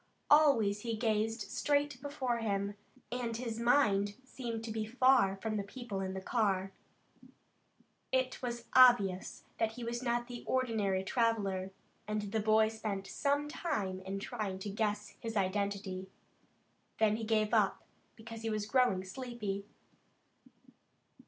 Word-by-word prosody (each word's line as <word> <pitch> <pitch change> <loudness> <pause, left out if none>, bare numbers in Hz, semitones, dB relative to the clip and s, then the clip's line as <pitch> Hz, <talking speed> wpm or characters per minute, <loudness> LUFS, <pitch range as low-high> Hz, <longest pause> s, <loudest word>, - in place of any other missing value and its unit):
Always 255 -10 +5
he 230 0 -2
gazed 220 0 0
straight 290 -2 0
before 265 -4 -2
him, 200 -2 -1 0.4
and 240 -2 -2
his 230 -2 -4
mind 210 -5 +3
seemed 235 -4 -5
to 225 - -5
be 220 0 -2
far 250 -3 +4
from 215 +2 -3
the 200 - -1
people 210 -1 -6
in 190 0 -3
the 190 - -4
car. 195 -3 0 1.4
It 260 0 0
was 240 -2 -4
obvious 240 -8 +5 0.2
that 225 0 +1
he 245 +1 -7
was 235 +1 -3
not 240 -1 0
the 245 -1 -7
ordinary 215 -7 +1
traveler, 200 -4 0 0.4
and 215 0 -1
the 220 - +1
boy 215 +1 +4
spent 215 -3 -4
some 285 +7 0
time 215 - -2
in 190 +1 -4
trying 200 -2 -4
to 205 - -4
guess 210 0 -1
his 225 -1 -4
identity. 195 -1 -1 0.9
Then 215 -1 +3
he 225 - -5
gave 215 -1 +2
it - - -9
up, - - +2 0.3
because 225 0 -9
he 225 - -2
was 215 -1 -1
growing 245 -5 +2
sleepy. 210 -2 -5
220 Hz, 145 wpm, -33 LUFS, 200-245 Hz, 1.4 s, Always